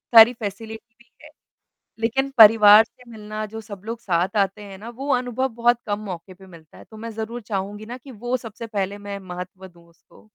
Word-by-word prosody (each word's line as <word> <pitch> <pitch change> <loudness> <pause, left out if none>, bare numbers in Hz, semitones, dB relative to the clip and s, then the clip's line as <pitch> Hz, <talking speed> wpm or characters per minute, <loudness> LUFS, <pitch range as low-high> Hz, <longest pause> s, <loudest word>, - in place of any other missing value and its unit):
सारी 225 +2 +10
फ़ेसिलिटीज़ 225 +1 -8
भी 235 - -36
हैं। - - -13 0.7
लेक़िन 265 +5 0
परिवार 215 -1 +9
से 245 +1 -20
मिलना 215 0 -6
जो 220 +1 -8
सब 205 -3 -10
लोग 230 +1 -5
साथ 185 -1 -1
आते 200 +1 0
हैं 195 -1 -10
ना 220 +4 -9
वो 270 +4 -7
अनुभव 250 +1 0
बहुत 240 +1 +2
कम 205 -1 -2
मौके 185 0 -7
पे 190 +1 -17
मिलता 165 -3 -16
है। - - -13
तो 220 - -15
मैं 230 +1 -6
ज़रूर 225 +2 -5
चाहूँगी 205 0 -5
ना 245 +3 -7
कि 265 +1 -13
वो 240 +3 -3
सबसे 225 0 -9
पहले 200 -2 -3
मैं 200 -1 -7
महत्व 185 +1 -8
दूँ 170 -1 -21
उसको। 170 - -23
215 Hz, 210 wpm, -23 LUFS, 195-230 Hz, 0.7 s, सारी